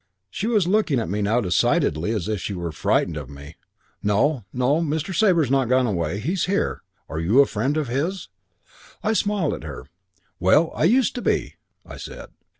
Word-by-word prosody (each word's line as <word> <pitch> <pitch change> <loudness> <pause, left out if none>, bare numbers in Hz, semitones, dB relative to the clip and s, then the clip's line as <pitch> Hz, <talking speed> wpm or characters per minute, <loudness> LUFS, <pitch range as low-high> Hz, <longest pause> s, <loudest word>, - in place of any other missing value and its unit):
She 200 - -3
was 215 -6 +2
looking 180 - +2
at 110 - -3
me 105 +1 -1
now 110 +4 +2
decidedly 85 -3 +1
as 105 -5 -2
if 105 -4 -2
she 100 - -4
were 85 -2 -4
frightened 80 +1 0
of 70 -4 -7
me. 70 +2 -11 0.5
'No, 115 +4 +1
no, 130 +6 +1
Mr. 160 +3 -2
Sabre's 170 - +3
not 135 -3 +2
gone 130 0 +3
away. 90 -4 -1
He's 170 - -1
here. 200 +2 -1 0.3
Are 80 - -4
you 95 +11 +3
a 140 - +8
friend 130 +8 -1
of 150 -3 -1
his?' 155 +10 -2 0.8
"I 220 - +1
smiled 205 -7 0
at - - -7
her. 70 -5 -8 0.5
'Well, 150 - +4
I - - +1
used 245 +6 +3
to 245 - -5
be,' - - 0 0.3
I - - -10
said. - - -9
130 Hz, 190 wpm, -23 LUFS, -, 0.8 s, a